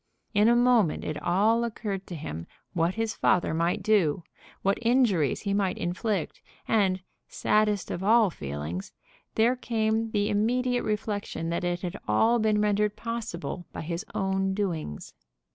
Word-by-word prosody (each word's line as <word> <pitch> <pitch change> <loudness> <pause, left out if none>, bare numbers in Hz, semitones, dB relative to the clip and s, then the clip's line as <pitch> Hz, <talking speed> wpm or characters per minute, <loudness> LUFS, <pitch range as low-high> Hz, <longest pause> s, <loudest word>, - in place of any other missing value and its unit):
In 210 +1 +4
a 235 - +5
moment 240 -8 +3
it 150 -1 -4
all 210 +8 +3
occurred 210 -4 -4
to 175 - -6
him 85 - -6 0.3
what 170 +2 +1
his 225 -1 -1
father 180 -3 +2
might 175 +5 0
do, 185 -6 +2 0.4
what 195 +1 +2
injuries 230 - +2
he 200 -2 -1
might 195 -2 0
inflict; 185 +1 -2 0.3
and, 190 -4 +2 0.3
saddest 210 -2 +1
of 180 - -4
all 220 -1 +5
feelings, 75 - -5 0.4
there 235 +3 +4
came 225 -2 0
the 205 -1 0
immediate 245 +4 +1
reflection 205 -5 -3
that 170 +2 -2
it 175 0 -1
had 175 - -3
all 225 - +3
been 215 -1 +2
rendered 210 0 +1
possible 225 -7 -5
by - - -6
his 170 +3 -4
own 190 0 0
doings. 165 - -3
205 Hz, 150 wpm, -27 LUFS, 175-220 Hz, 0.4 s, a